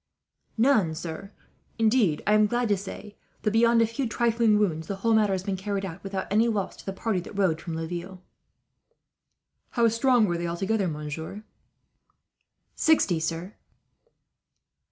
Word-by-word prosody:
"None, 220 Hz, -, +3 dB
sir. 165 Hz, +5 st, -7 dB, 0.5 s
Indeed 220 Hz, -8 st, +2 dB
I 210 Hz, -, +3 dB
am 215 Hz, 0 st, +5 dB
glad 240 Hz, +1 st, 0 dB
to 205 Hz, -, +4 dB
say 200 Hz, +2 st, -9 dB, 0.3 s
that, 210 Hz, -, +1 dB
beyond 230 Hz, +1 st, +4 dB
a -, -, +4 dB
few 230 Hz, +2 st, -3 dB
trifling 230 Hz, -2 st, +2 dB
wounds, 160 Hz, -6 st, 0 dB
the 200 Hz, -, -3 dB
whole 225 Hz, +4 st, +1 dB
matter 215 Hz, -2 st, +3 dB
has 190 Hz, -1 st, -1 dB
been 195 Hz, 0 st, -2 dB
carried 195 Hz, +1 st, -3 dB
out 180 Hz, 0 st, -8 dB
without 195 Hz, -1 st, -3 dB
any 220 Hz, +3 st, +4 dB
loss 210 Hz, -4 st, -2 dB
to -, -, -14 dB
the -, -, -1 dB
party 195 Hz, 0 st, -1 dB
that 195 Hz, +3 st, -9 dB
rode 170 Hz, -5 st, +1 dB
from 165 Hz, -2 st, -5 dB
Laville." 175 Hz, +3 st, -5 dB, 1.5 s
"How 235 Hz, -2 st, +2 dB
strong 235 Hz, 0 st, +3 dB
were 175 Hz, -3 st, -1 dB
they 170 Hz, -, -2 dB
altogether, 195 Hz, +4 st, -1 dB
monsieur?" 160 Hz, +6 st, -6 dB, 1.3 s
"Sixty, 200 Hz, -, +3 dB
sir." 165 Hz, +4 st, -3 dB
200 Hz, 155 wpm, -26 LUFS, 175-225 Hz, 1.5 s, am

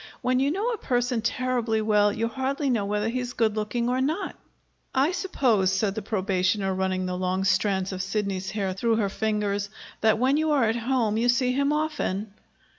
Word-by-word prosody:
"When 255 Hz, 0 st, +2 dB
you 275 Hz, +2 st, +2 dB
know 400 Hz, +9 st, -1 dB
a 450 Hz, -, -3 dB
person 245 Hz, -2 st, 0 dB
terribly 240 Hz, -1 st, 0 dB
well, 210 Hz, -1 st, +3 dB
you 225 Hz, +2 st, -1 dB
hardly 270 Hz, +3 st, -1 dB
know 220 Hz, -5 st, +1 dB
whether 210 Hz, +1 st, -1 dB
he's 245 Hz, +1 st, -3 dB
good 220 Hz, -2 st, +1 dB
looking 220 Hz, +3 st, -1 dB
or 255 Hz, +1 st, +1 dB
not." 320 Hz, +8 st, -1 dB, 0.6 s
"I 275 Hz, +5 st, +3 dB
suppose," 245 Hz, -, +1 dB
said 195 Hz, +1 st, 0 dB
the 220 Hz, -, -4 dB
probationer, 195 Hz, -1 st, 0 dB
running 185 Hz, 0 st, -1 dB
the 180 Hz, 0 st, -2 dB
long 185 Hz, +1 st, -1 dB
strands 190 Hz, 0 st, +1 dB
of 185 Hz, -1 st, -3 dB
Sidney's 195 Hz, -1 st, -2 dB
hair 195 Hz, -3 st, -2 dB
through 225 Hz, +4 st, +1 dB
her 210 Hz, -3 st, +1 dB
fingers, 205 Hz, -1 st, -1 dB, 0.3 s
"that 220 Hz, 0 st, +3 dB
when 260 Hz, +5 st, +2 dB
you 315 Hz, 0 st, +1 dB
are 275 Hz, -4 st, +3 dB
at 225 Hz, 0 st, +2 dB
home 235 Hz, -2 st, 0 dB
you 240 Hz, +2 st, +2 dB
see 250 Hz, 0 st, +3 dB
him 280 Hz, +2 st, +1 dB
often." 260 Hz, -10 st, -2 dB
220 Hz, 190 wpm, -26 LUFS, 200-255 Hz, 0.6 s, well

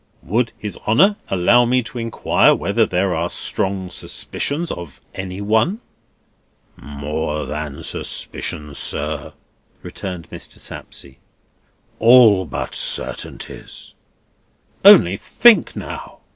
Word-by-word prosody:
"Would 115 Hz, +6 st, 0 dB
His 105 Hz, -2 st, -7 dB
Honour 185 Hz, -, +4 dB
allow 95 Hz, +6 st, +4 dB
me 125 Hz, +1 st, +1 dB
to 120 Hz, +1 st, -7 dB
inquire 115 Hz, -1 st, +2 dB
whether -, -, 0 dB
there 95 Hz, -2 st, 0 dB
are 85 Hz, +2 st, -1 dB
strong 95 Hz, -2 st, -2 dB
suspicions 155 Hz, -, -3 dB
of 85 Hz, -5 st, -8 dB
any 95 Hz, +1 st, -6 dB
one?" 110 Hz, -, +1 dB, 1.0 s
"More 75 Hz, +2 st, -4 dB
than 75 Hz, -1 st, -6 dB
suspicions, 75 Hz, -1 st, -3 dB
sir," -, -, -2 dB, 0.5 s
returned 90 Hz, -3 st, -7 dB
Mr. -, -, -6 dB
Sapsea; 65 Hz, -1 st, -7 dB, 0.8 s
"all 115 Hz, -5 st, +6 dB
but 75 Hz, -, -5 dB
certainties." -, -, -3 dB, 0.9 s
"Only 90 Hz, +3 st, +7 dB
think 240 Hz, -, +4 dB
now!" -, -, -8 dB
95 Hz, 105 wpm, -19 LUFS, 80-120 Hz, 1.0 s, Only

